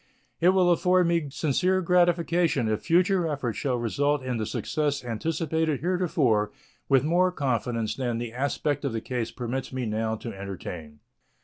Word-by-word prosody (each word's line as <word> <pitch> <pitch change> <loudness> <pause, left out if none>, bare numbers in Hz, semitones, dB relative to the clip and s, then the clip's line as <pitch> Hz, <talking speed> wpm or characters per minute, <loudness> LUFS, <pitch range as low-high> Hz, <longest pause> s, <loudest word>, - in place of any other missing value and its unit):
It 175 - +5
will 185 -1 +4
afford 180 +1 +3
me 170 -3 +1
sincere 165 +6 +1
gratification 170 -6 +2
if 110 -1 -1
future 180 +1 +3
efforts 135 -7 -3
shall 130 -3 0
result 145 +4 0
in 125 -2 -2
the 110 -2 -2
success 145 +3 -2
anticipated 160 +4 -1
heretofore 155 - +1 0.4
with 135 -2 +4
more 175 +4 +3
confidence 120 -7 -1
than 120 -3 -2
the 115 -1 -5
aspect 140 +3 -1
of 140 -4 -1
the 115 - -2
case 120 -2 -3
permits 130 +2 -4
me 130 -1 -3
now 110 +1 -1
to 115 +1 -7
entertain. 90 -6 -8
140 Hz, 155 wpm, -26 LUFS, 115-170 Hz, 0.4 s, It